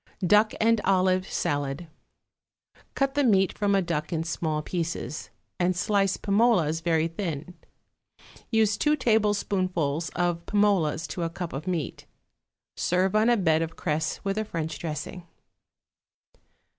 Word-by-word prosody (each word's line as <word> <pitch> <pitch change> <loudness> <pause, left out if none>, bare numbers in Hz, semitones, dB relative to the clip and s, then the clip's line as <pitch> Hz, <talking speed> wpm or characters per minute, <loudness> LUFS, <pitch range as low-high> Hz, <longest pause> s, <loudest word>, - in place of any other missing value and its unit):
=Duck 210 +4 +4
and 225 0 +3
Olive 185 -1 +2
Salad.= 145 +2 -2 1.1
Cut 275 0 +1
the 290 - +2
meat 195 -6 +3
from 200 -1 +1
a 195 - +2
duck 155 -3 -3
in 160 -1 -1
small 160 -2 -2
pieces, 165 -2 -4 0.3
and 180 0 +2
slice 195 0 +1
pim 200 0 0
olas 170 -10 +3
very 165 -1 +2
thin; 165 -1 -5 1.0
use 220 -2 +2
two 300 0 +2
tablespoonfuls 190 - 0
of 175 -1 0
pim 205 -1 +2
olas 165 -6 +2
to 175 - -4
a 165 - -1
cup 170 0 -6
of 145 +6 -6
meat. 175 -5 -3 0.7
Serve 185 +3 +1
on 215 +2 +4
a 240 - +4
bed 160 -5 +2
of 165 0 -3
cress 155 -1 -2
with 195 +1 -1
a - - 0
French 160 -6 -4
dressing. 170 +2 -5
180 Hz, 145 wpm, -26 LUFS, 160-205 Hz, 1.1 s, =Duck